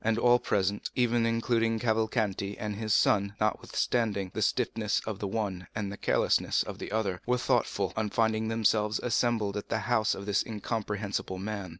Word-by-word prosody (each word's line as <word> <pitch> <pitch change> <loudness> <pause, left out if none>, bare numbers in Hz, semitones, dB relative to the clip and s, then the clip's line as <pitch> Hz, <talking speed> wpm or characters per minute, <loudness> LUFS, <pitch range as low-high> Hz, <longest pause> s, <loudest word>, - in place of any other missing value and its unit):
And 110 0 +2
all 120 +1 +5
present, 100 -3 0
even 120 -2 +2
including 115 0 +1
Cavalcanti 110 -3 0
and 105 -1 -4
his 110 +1 -3
son, 100 0 +3
notwithstanding 105 -2 0
the - - -3
stiffness 105 -2 +1
of 110 -3 -4
the 100 - -2
one 95 -4 -3
and 100 -2 -2
the - - -5
carelessness - - +2
of - - -8
the - - -6
other, 100 -4 -1
were 125 0 +3
thoughtful, - - 0
on 110 -1 -1
finding 110 0 +1
themselves 110 -1 +2
assembled 115 -4 +1
at 105 - -6
the 110 - 0
house 110 -1 +1
of 100 - -7
this 100 -1 +1
incomprehensible 105 -3 -3
man. 100 -1 -4
110 Hz, 175 wpm, -29 LUFS, 100-115 Hz, -, all